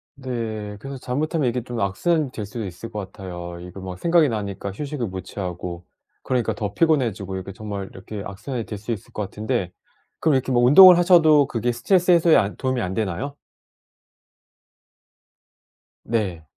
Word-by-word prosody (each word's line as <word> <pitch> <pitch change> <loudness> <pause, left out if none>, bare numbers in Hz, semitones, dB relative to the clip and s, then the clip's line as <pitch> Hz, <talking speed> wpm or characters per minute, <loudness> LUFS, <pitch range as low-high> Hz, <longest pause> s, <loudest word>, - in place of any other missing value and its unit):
네. 110 -6 -5
그래서 135 +4 -7
잘못하면 145 +3 -1
이게 120 0 -3
좀 120 -1 -5
악순환이 135 - 0
될 105 -5 -5
수도 110 +1 -5
있을 95 +5 -8
것 105 - -5
같아요. 90 -2 -7
이거 90 +2 -9
막 90 -1 -7
생각이 170 -3 +4
나니까 100 -3 -4
휴식을 140 +3 -4
못 95 0 -5
취하고 90 -2 -6 0.4
그러니까 125 -3 0
더 100 -2 -4
피곤해지고 115 - +1
이게 95 +1 -7
정말 100 -3 -6
이렇게 100 +1 -8
악순환이 110 +4 -5
될 105 - -6
수 105 +4 -5
있을 110 -5 -6
것 - - -3
같은데 105 -1 -3 0.5
그럼 160 - +2
이렇게 130 0 0
뭐 120 -1 +3
운동을 180 +8 +10
하셔도 160 -5 +6
그게 120 -1 -1
스트레스 180 +10 +2
해소에 170 -2 +5
안 100 -1 +2
도움이 130 -2 -1
안 90 -1 -2
되나요? 110 +8 -3 2.7
네. 100 -8 -2
115 Hz, 360 characters per minute, -23 LUFS, 100-135 Hz, 2.7 s, 운동을